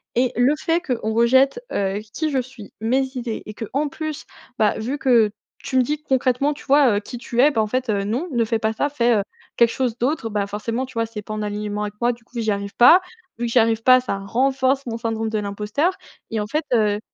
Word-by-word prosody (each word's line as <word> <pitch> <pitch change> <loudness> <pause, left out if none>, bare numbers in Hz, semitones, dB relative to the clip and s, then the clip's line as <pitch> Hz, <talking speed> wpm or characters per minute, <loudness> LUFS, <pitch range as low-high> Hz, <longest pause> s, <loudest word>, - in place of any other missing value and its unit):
Et 245 +1 +2
le 255 +5 +3
fait 330 +2 +1
qu'on 240 -8 -2
rejette, 260 - +4
heu, 195 +1 -1
qui 315 -2 -1
je 270 - +1
suis, 245 -5 -12
mes 255 +4 +2
idées 235 -2 -4
et 215 - -8
qu'en 275 +8 -2
plus, 310 +1 -5 0.3
bah, 215 -1 +2
vu 255 +6 -3
que 235 -6 +4 0.3
tu 260 - -1
me 255 - +5
dis 300 +4 -2
concrètement: 265 +1 +1
«Tu - - -13
vois, 275 -6 +4
heu, - - +1
qui 240 +3 -8
tu 240 0 -4
es? 285 +4 +6
Bah, 225 -6 +1
en 215 - 0
fait, 255 +2 -2
heu, 200 -1 0
non 240 - -2
ne 235 -2 +2
fais 225 +1 0
pas 220 0 0
ça 285 +6 0
fais, 240 -5 +2
heu, - - +2 0.4
quelque 235 -1 +5
chose 250 -3 -1
d'autre». 245 -2 -1
Bah 205 -1 -1
forcément, 230 +5 -3
tu - - -14
vois, 230 0 0
c'est 225 -2 -7
pas 215 +1 -7
en 215 - -3
alignement 210 0 -3
avec 210 -1 -4
moi, 240 +1 +2
du 235 0 -17
coup 240 0 -8
j'y 220 -1 -1
arrive 200 0 -4
pas. 285 +10 +8 0.4
Vu 240 - -2
que 235 - -3
j'y 245 - +5
arrive 225 0 +2
pas 255 +1 +7
ça 220 -6 -3
renforce 260 +6 +1
mon 230 0 -3
syndrome 225 -1 -2
de 215 - -1
l'imposteur 210 - -1 0.4
et 225 - -1
en 210 - -2
fait, 305 +8 -1
heu, 210 -2 +2
235 Hz, 250 wpm, -22 LUFS, 215-265 Hz, 0.4 s, pas